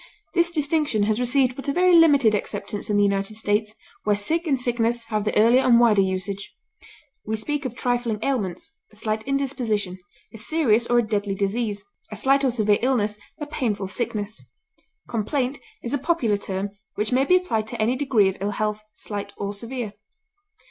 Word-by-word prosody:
This 345 Hz, -1 st, +3 dB
distinction 300 Hz, -8 st, +1 dB
has 215 Hz, +2 st, +1 dB
received 250 Hz, 0 st, +2 dB
but 275 Hz, -, -8 dB
a -, -, +2 dB
very 360 Hz, +3 st, +4 dB
limited 285 Hz, -9 st, +6 dB
acceptance 205 Hz, 0 st, -3 dB
in 205 Hz, -, +2 dB
the 205 Hz, -, +4 dB
United 200 Hz, +1 st, 0 dB
States, 210 Hz, 0 st, 0 dB, 0.3 s
where 210 Hz, -1 st, +2 dB
sick 325 Hz, -, 0 dB
and 275 Hz, -4 st, +2 dB
sickness 235 Hz, -1 st, 0 dB
have 215 Hz, -2 st, -1 dB
the 215 Hz, -, 0 dB
earlier 235 Hz, +4 st, +6 dB
and 240 Hz, -3 st, +5 dB
wider 220 Hz, -4 st, +5 dB
usage. 190 Hz, +1 st, -3 dB, 0.7 s
We 220 Hz, -, -2 dB
speak 285 Hz, +6 st, -2 dB
of 250 Hz, -2 st, -4 dB
trifling 245 Hz, -3 st, 0 dB
ailments, 205 Hz, -10 st, -2 dB
a -, -, -19 dB
slight 215 Hz, 0 st, -2 dB
indisposition, 240 Hz, -9 st, -1 dB, 0.3 s
a 225 Hz, -, -9 dB
serious 235 Hz, -3 st, +2 dB
or 240 Hz, -, +3 dB
a 240 Hz, -, +4 dB
deadly 205 Hz, -2 st, -1 dB
disease; 205 Hz, +1 st, -1 dB, 0.3 s
a -, -, -5 dB
slight 275 Hz, +5 st, +3 dB
or 265 Hz, -, +3 dB
severe 215 Hz, -4 st, +2 dB
illness; 215 Hz, -5 st, +1 dB, 0.2 s
a 295 Hz, -, -3 dB
painful 230 Hz, -9 st, -2 dB
sickness. 215 Hz, -1 st, -4 dB, 0.7 s
Complaint 255 Hz, +4 st, -1 dB, 0.2 s
is 235 Hz, -, -3 dB
a 285 Hz, -, +1 dB
popular 260 Hz, -9 st, +1 dB
term, 195 Hz, 0 st, -3 dB, 0.2 s
which 210 Hz, +3 st, -1 dB
may 255 Hz, +2 st, +3 dB
be 360 Hz, +6 st, +4 dB
applied 225 Hz, -13 st, 0 dB
to 235 Hz, +1 st, -6 dB
any 225 Hz, +4 st, +2 dB
degree 255 Hz, -7 st, +3 dB
of 190 Hz, -, -2 dB
ill 200 Hz, -, 0 dB
health, 215 Hz, 0 st, -1 dB
slight 200 Hz, -1 st, -5 dB
or 200 Hz, 0 st, -3 dB
severe. 230 Hz, 0 st, -5 dB
225 Hz, 185 wpm, -24 LUFS, 205-265 Hz, 0.7 s, limited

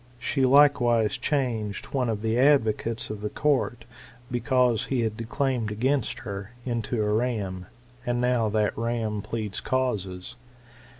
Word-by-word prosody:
*' -, -, -27 dB
She 130 Hz, +2 st, 0 dB
likewise 125 Hz, -6 st, +4 dB
changed 115 Hz, -8 st, -2 dB
one 130 Hz, -3 st, +1 dB
of 110 Hz, -1 st, -2 dB
the 110 Hz, 0 st, +1 dB
advocates 115 Hz, -5 st, +2 dB
of 105 Hz, -1 st, -6 dB
the 105 Hz, -, -2 dB
court, 125 Hz, -5 st, 0 dB, 0.5 s
because 125 Hz, -2 st, +2 dB
he 130 Hz, -3 st, 0 dB
had 110 Hz, -2 st, -1 dB
declaimed 120 Hz, 0 st, -1 dB
against 125 Hz, +4 st, 0 dB
her, 100 Hz, 0 st, -6 dB
into 115 Hz, -2 st, -1 dB
a 105 Hz, 0 st, +1 dB
ram; 105 Hz, -6 st, -1 dB, 0.4 s
and 120 Hz, 0 st, -1 dB
now 125 Hz, -3 st, +2 dB
that 105 Hz, 0 st, +1 dB
ram 115 Hz, -2 st, -2 dB
pleads 105 Hz, -2 st, -4 dB
causes. 110 Hz, -4 st, -2 dB
115 Hz, 140 wpm, -26 LUFS, 105-125 Hz, 0.5 s, likewise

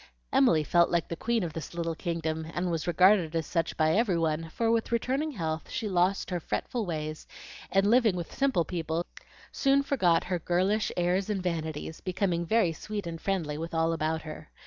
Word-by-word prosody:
Emily 155 Hz, +3 st, +4 dB
felt 170 Hz, +2 st, +3 dB
like 170 Hz, -2 st, 0 dB
the 170 Hz, -, -3 dB
queen 230 Hz, +4 st, 0 dB
of 165 Hz, -3 st, -4 dB
this 165 Hz, +1 st, -7 dB
little 165 Hz, -1 st, -1 dB
kingdom, 160 Hz, -2 st, -3 dB
and 175 Hz, 0 st, -1 dB
was 165 Hz, 0 st, -2 dB
regarded 180 Hz, -1 st, +4 dB
as 165 Hz, -1 st, 0 dB
such 165 Hz, -2 st, -1 dB
by 155 Hz, 0 st, +3 dB
every 200 Hz, -1 st, +2 dB
one, 160 Hz, 0 st, -1 dB
for 225 Hz, +7 st, 0 dB
with 230 Hz, 0 st, 0 dB
returning 265 Hz, +6 st, 0 dB
health 160 Hz, -6 st, -3 dB
she 220 Hz, -, -3 dB
lost 185 Hz, 0 st, +1 dB
her 175 Hz, -, 0 dB
fretful 225 Hz, +6 st, -3 dB
ways, 155 Hz, -2 st, -4 dB, 0.4 s
and 195 Hz, +1 st, +3 dB
living 225 Hz, -2 st, +4 dB
with 175 Hz, -2 st, -5 dB
simple 265 Hz, -12 st, +1 dB
people, 165 Hz, 0 st, -2 dB, 0.5 s
soon 275 Hz, 0 st, +3 dB
forgot 180 Hz, -12 st, +2 dB
her 180 Hz, -1 st, -2 dB
girlish 190 Hz, +6 st, +1 dB
airs 180 Hz, +3 st, +1 dB
and 195 Hz, -3 st, -1 dB
vanities, 160 Hz, -2 st, -3 dB
becoming 180 Hz, -2 st, -1 dB
very 215 Hz, -6 st, +3 dB
sweet 205 Hz, +4 st, -5 dB
and 165 Hz, -1 st, -6 dB
friendly 160 Hz, -7 st, -1 dB
with 165 Hz, +1 st, -5 dB
all 165 Hz, 0 st, +2 dB
about 160 Hz, 0 st, -1 dB
her. 155 Hz, 0 st, -9 dB
175 Hz, 190 wpm, -29 LUFS, 160-200 Hz, 0.5 s, Emily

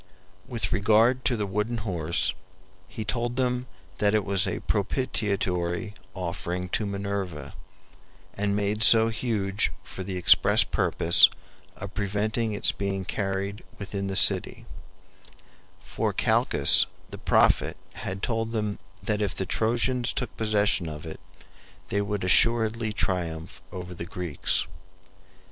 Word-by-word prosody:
With 120 Hz, -3 st, -2 dB
regard 110 Hz, +5 st, +3 dB
to 125 Hz, -, +1 dB
the 105 Hz, -, -1 dB
wooden 105 Hz, +4 st, -2 dB
horse, 85 Hz, -6 st, -1 dB, 0.5 s
he 110 Hz, -, -7 dB
told 120 Hz, +3 st, -1 dB
them 125 Hz, -1 st, -1 dB, 0.3 s
that 105 Hz, 0 st, +2 dB
it 105 Hz, -3 st, +1 dB
was 100 Hz, +1 st, +1 dB
a -, -, -3 dB
propitiatory 100 Hz, -4 st, -1 dB, 0.2 s
offering 90 Hz, 0 st, -4 dB
to 105 Hz, -, -1 dB
Minerva, 100 Hz, -5 st, -4 dB, 0.8 s
and 100 Hz, 0 st, -1 dB
made 105 Hz, +1 st, -1 dB
so 115 Hz, 0 st, +7 dB
huge 110 Hz, -4 st, -1 dB
for -, -, -9 dB
the 95 Hz, 0 st, -4 dB
express 90 Hz, -, +5 dB
purpose 85 Hz, +3 st, +5 dB, 0.5 s
of 100 Hz, +1 st, -8 dB
preventing 105 Hz, +3 st, -1 dB
its 105 Hz, -, +2 dB
being 95 Hz, -1 st, -3 dB
carried 100 Hz, +2 st, -3 dB
within 100 Hz, -1 st, -4 dB
the 95 Hz, -, -3 dB
city; 95 Hz, -, +2 dB, 1.1 s
for -, -, -3 dB
Calchas -, -, +5 dB, 0.2 s
the -, -, -8 dB
prophet -, -, +2 dB, 0.2 s
had 95 Hz, +1 st, -6 dB
told 115 Hz, -1 st, -2 dB
them 105 Hz, -2 st, -2 dB, 0.2 s
that 105 Hz, +1 st, -1 dB
if 100 Hz, -2 st, -1 dB
the 95 Hz, -, -2 dB
Trojans 120 Hz, +4 st, 0 dB
took 125 Hz, -4 st, -3 dB
possession 105 Hz, -5 st, +1 dB
of 75 Hz, +1 st, -8 dB
it 80 Hz, -, -8 dB, 0.7 s
they 100 Hz, -, 0 dB
would 100 Hz, -1 st, -3 dB
assuredly 110 Hz, +3 st, +2 dB
triumph 90 Hz, -4 st, -3 dB
over 90 Hz, 0 st, -7 dB
the 85 Hz, -, -7 dB
Greeks. 85 Hz, -5 st, -1 dB
100 Hz, 130 wpm, -26 LUFS, 95-110 Hz, 1.1 s, so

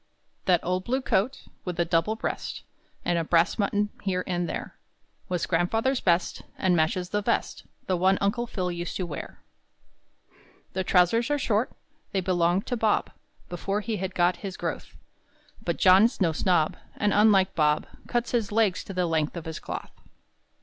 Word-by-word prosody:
That 180 Hz, -3 st, +3 dB
old 185 Hz, +1 st, -1 dB
blue 255 Hz, +5 st, 0 dB
coat, 235 Hz, +6 st, 0 dB, 0.2 s
With 180 Hz, -1 st, -5 dB
a 170 Hz, -, +3 dB
double 165 Hz, +5 st, +1 dB
breast -, -, -4 dB, 0.4 s
And 175 Hz, -1 st, +2 dB
a -, -, 0 dB
brass 165 Hz, +1 st, +3 dB
button 205 Hz, 0 st, 0 dB
here 185 Hz, -2 st, -1 dB
and 175 Hz, -1 st, -1 dB
there, -, -, -5 dB, 0.5 s
Was 180 Hz, -2 st, 0 dB
grandfather's 225 Hz, +10 st, +1 dB
best, 175 Hz, 0 st, +1 dB, 0.2 s
And 185 Hz, -2 st, +2 dB
matches 175 Hz, +3 st, +1 dB
the 210 Hz, +1 st, 0 dB
vest -, -, -1 dB, 0.2 s
The 185 Hz, -, +1 dB
one 190 Hz, +2 st, +3 dB
Uncle 235 Hz, +5 st, 0 dB
Phil 180 Hz, -5 st, -2 dB
used 175 Hz, 0 st, -4 dB
to 185 Hz, -, -2 dB
wear. 150 Hz, -4 st, -8 dB, 1.3 s
The 190 Hz, -, -1 dB
trousers 185 Hz, +7 st, +3 dB
are 290 Hz, -, +2 dB
short; 230 Hz, -3 st, 0 dB, 0.4 s
They 195 Hz, -, +2 dB
belonged 180 Hz, 0 st, +1 dB
to 245 Hz, -, -2 dB
Bob 220 Hz, -2 st, +1 dB, 0.4 s
Before 195 Hz, +4 st, -2 dB
he 220 Hz, 0 st, -2 dB
had 190 Hz, 0 st, -4 dB
got 175 Hz, 0 st, +3 dB
his 195 Hz, -2 st, -6 dB
growth; -, -, -5 dB, 0.7 s
But -, -, -1 dB
John's 195 Hz, +5 st, +5 dB
no 175 Hz, -5 st, +3 dB
snob, 160 Hz, -1 st, +1 dB, 0.2 s
And, 205 Hz, -1 st, +1 dB
unlike 200 Hz, -3 st, +5 dB
Bob, 150 Hz, -1 st, +2 dB, 0.2 s
Cuts 240 Hz, -1 st, -1 dB
his 225 Hz, -4 st, 0 dB
legs 210 Hz, -4 st, +2 dB
to 195 Hz, -, -7 dB
the 180 Hz, -1 st, +1 dB
length 160 Hz, 0 st, 0 dB
of 170 Hz, -, -6 dB
his 160 Hz, -1 st, -5 dB
cloth. -, -, -6 dB
185 Hz, 170 wpm, -27 LUFS, 175-210 Hz, 1.3 s, John's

